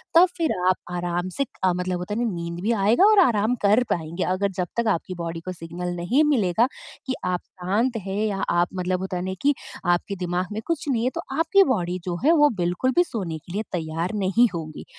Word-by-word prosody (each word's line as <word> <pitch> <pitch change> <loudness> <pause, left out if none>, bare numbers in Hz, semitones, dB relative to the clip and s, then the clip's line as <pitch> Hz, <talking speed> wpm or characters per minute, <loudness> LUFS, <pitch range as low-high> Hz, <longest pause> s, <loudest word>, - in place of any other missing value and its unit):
तब 350 +2 +8
फ़िर 330 -2 +1 0.2
आप 185 - +4 0.2
आराम 175 +1 -2
से 275 - +1 0.2
अ, 185 -1 +4
मतलब 180 0 -2
होता 180 +3 -4
है - - +1
नींद 170 0 -5
भी 220 +4 +1
आएगा 225 - +4
और 430 -2 +6
आराम 225 0 +2
कर 215 +5 +5
पाएँगे। 165 +2 -2
अगर 195 +2 0
जब 180 -1 0
तक 235 -1 +1
आपकी 185 - -6
बॉडी 165 0 -4
को 185 - -3
सिग्नल 175 +1 -5
नहीं 230 - +2
मिलेगा 225 -3 +3 0.4
कि 260 - -1
आप 180 -1 0
शांत 210 +7 -1
हैं 195 +1 -2
या 200 -2 -2
आप 175 0 +3
मतलब 185 0 -1
होता 190 -1 -3
नहीं 190 +1 -3
कि 290 +1 +4 0.3
आपके 175 +3 +1
दिमाग 180 +1 -1
में 215 +1 -3
कुछ 330 -3 -2
नहीं 235 -4 +1
है 255 - +2
तो - - -2 0.2
आपकी 370 +5 +5
बॉडी 180 -2 -2
जो 175 - -2
है 320 - +6
वो 295 - +7
बिल्कुल 180 +9 +1
भी 350 - +6
सोने 185 - -4
के 170 +3 -12
लिए 210 +3 -1
तैयार 165 +2 -2
नहीं 230 +6 +4
होगी। 155 -2 -6
185 Hz, 220 wpm, -24 LUFS, 175-235 Hz, 0.4 s, तब